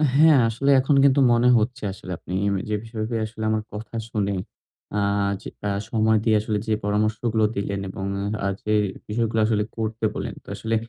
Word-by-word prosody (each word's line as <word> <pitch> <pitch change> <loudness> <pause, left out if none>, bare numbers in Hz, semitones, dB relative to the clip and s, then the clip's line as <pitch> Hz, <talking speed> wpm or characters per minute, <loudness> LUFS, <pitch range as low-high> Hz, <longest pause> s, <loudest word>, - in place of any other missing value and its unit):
হ্যাঁ। 155 0 +7
আসলে 135 +5 -1
এখন 135 +2 +2
কিন্তু 140 0 +5
মনে 120 +1 +3
হচ্ছে 115 +1 -1
আসলে 95 -1 -9
আপনি 90 - -8 0.2
ওই 95 - -1
যে 105 - +1
বিষয়ে 110 0 -3
আসলে 110 0 -7
আমার 110 0 +1
কথা 105 +2 -7
শুনে 100 -2 -1 0.6
আ - - +2 0.4
যেটা 105 - -6 0.2
সময় 110 0 +3
দিয়ে 110 -2 +3
আসলে 105 0 -1
যে 110 - +2
পরামর্শগুলো 110 +2 +1
দিলেন 100 0 -2
এবং 95 +1 -5 0.4
আ - - +2 0.2
যে 105 - 0 0.3
বিষয়গুলো 115 +1 0
আসলে 110 -1 +1
করতে 110 0 -2
বললেন। - - -4
তো - - -33
আসলে 115 0 -2
110 Hz, 175 wpm, -24 LUFS, 105-115 Hz, 0.6 s, হ্যাঁ